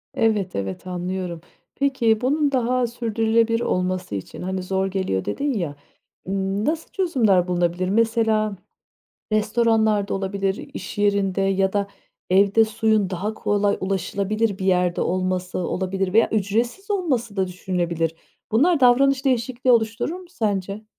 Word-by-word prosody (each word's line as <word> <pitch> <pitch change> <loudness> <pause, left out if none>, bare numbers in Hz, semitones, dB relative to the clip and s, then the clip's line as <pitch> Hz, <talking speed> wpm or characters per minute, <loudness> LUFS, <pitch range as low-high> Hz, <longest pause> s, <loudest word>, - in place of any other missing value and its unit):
Evet, 210 -5 +1
evet 95 - -4
anlıyorum, 180 -1 -4 0.3
peki 245 -6 +1
bunun 285 +3 +1
daha 250 -1 +1
sürdürülebilir 230 0 +1
olması 185 - -1
için, 95 - -7
hani, 185 +1 -3
zor 190 +1 0
geliyor 190 - -2
dedin 285 0 -1
ya, 170 -10 -3 0.5
ımm, 195 +2 -1
nasıl 320 +1 -2
çözümler 225 - +2
bulunabilir? 175 0 0
Mesela 220 -1 +2 0.8
restoranlar 215 -1 +2
da - - -1
olabilir, 195 0 -2
iş 190 - -7
yerinde 200 -2 +1
ya 195 0 +1
da 200 -1 0 0.4
evde 200 +4 +5
suyun 220 -2 +1
daha 195 +4 -3
kolay 205 -1 +1
ulaşılabilir 195 +2 -1
bir 190 - -3
yerde 180 -2 +2
olması 185 0 -1
olabilir 185 +1 -2
veya 225 +2 +4
ücretsiz 230 - -1
olması 260 - -1
da 190 -1 +1
düşünülebilir. 175 -3 -2 0.4
Bunlar 300 +8 +3
davranış 265 +2 +4
değişikliği 255 -1 +1
oluşturur 225 +7 +1
mu 365 0 -10
sence? 205 - -2
205 Hz, 130 wpm, -23 LUFS, 185-230 Hz, 0.8 s, evde